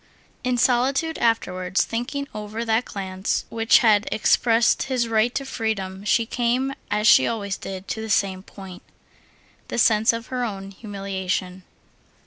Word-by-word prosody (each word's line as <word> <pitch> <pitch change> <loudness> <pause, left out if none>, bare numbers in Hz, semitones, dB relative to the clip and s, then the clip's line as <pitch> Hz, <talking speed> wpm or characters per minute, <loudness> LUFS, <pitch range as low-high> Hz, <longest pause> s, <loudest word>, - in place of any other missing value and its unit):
In 250 -1 0
solitude 270 +7 +1
afterwards, 185 -5 +1
thinking 255 +5 -4
over 215 +2 -5
that 225 +2 +1
glance 190 0 -3
which 225 0 +4
had 210 -2 +4
expressed 225 +1 +3
his 250 -3 0
right 225 +1 +2
to 275 - -2
freedom, 200 -6 -3
she 230 +2 +2
came, 245 +3 0 0.2
as 210 +1 +1
she 235 - +7
always 200 -4 -2
did, 190 0 -8
to 220 - -3
the 220 - -6
same 195 -2 +1
point—the 190 +3 -13
sense 220 -1 +4
of 230 +1 -6
her 250 -1 -1
own 195 -4 -5
humiliation. 190 -2 -4
220 Hz, 140 wpm, -23 LUFS, 195-235 Hz, 0.2 s, she